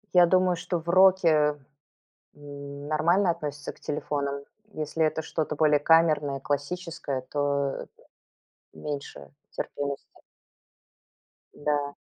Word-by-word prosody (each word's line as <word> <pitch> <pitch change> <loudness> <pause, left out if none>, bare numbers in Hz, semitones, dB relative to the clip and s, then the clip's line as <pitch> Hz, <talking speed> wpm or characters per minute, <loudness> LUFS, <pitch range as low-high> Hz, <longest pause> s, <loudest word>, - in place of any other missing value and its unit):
Я 175 -1 +8
думаю, 185 0 +3
что 175 0 -3
в 165 - -15
роке, 170 -5 +5 0.8
м, 140 0 -9
нормально 170 +5 +3
относятся 150 -3 -4
к - - -24
телефонам. 140 -1 -3 0.3
Если 155 +1 -2
это 160 +1 0
что-то 155 -1 -3
более 150 -1 +4
камерное, 150 -3 +3
классическое, 145 -2 -3
то 140 0 -1 0.9
меньше 140 - -6 0.2
терпимости. 140 -1 -4 1.5
Да. 145 -1 -1
150 Hz, 100 wpm, -27 LUFS, 145-165 Hz, 1.5 s, Я